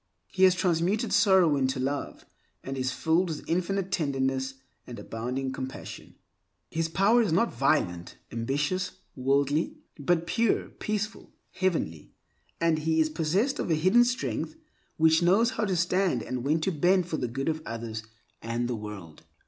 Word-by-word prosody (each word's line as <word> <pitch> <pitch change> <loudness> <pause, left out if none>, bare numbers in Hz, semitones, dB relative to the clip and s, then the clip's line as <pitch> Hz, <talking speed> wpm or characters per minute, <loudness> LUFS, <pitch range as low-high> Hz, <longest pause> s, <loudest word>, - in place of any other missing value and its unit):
He 190 0 +4
has 185 -1 +5
transmuted 185 +6 +1
sorrow 190 -7 +5
into 130 -1 0
love, 140 +2 -3 0.4
and 135 - -5
is 130 -1 -1
filled 165 +6 +1
with 155 - -6
infinite 185 +2 -1
tenderness 135 -5 -1 0.3
and 120 - -8
abounding 125 +4 -4
compassion. 130 0 -7 0.6
His 165 0 -1
power 200 +8 +4
is 210 -7 0
not 190 +8 +2
violent, 105 - 0 0.2
ambitious, 145 +10 -1 0.2
worldly, 140 +4 +1 0.2
but 165 +4 +1
pure, 230 +4 +1
peaceful, 215 +1 -4 0.2
heavenly, 165 - -2 0.5
and 165 -2 +2
he 160 +1 +1
is 155 -1 +2
possessed 190 - 0
of - - -2
a 160 - +3
hidden 185 +10 +5
strength 245 +5 -2 0.4
which 160 +1 +4
knows 200 +8 +4
how 230 -4 -1
to 190 -2 0
stand 180 +2 +1
and 125 -1 -4
when 150 +4 +2
to 190 - 0
bend 180 +3 +3
for 160 - -2
the 125 - -2
good 135 +4 -4
of 160 -1 -1
others 115 -3 -5 0.4
and 115 +1 -2
the 120 - -2
world. 105 -7 -8
160 Hz, 155 wpm, -28 LUFS, 130-185 Hz, 0.6 s, has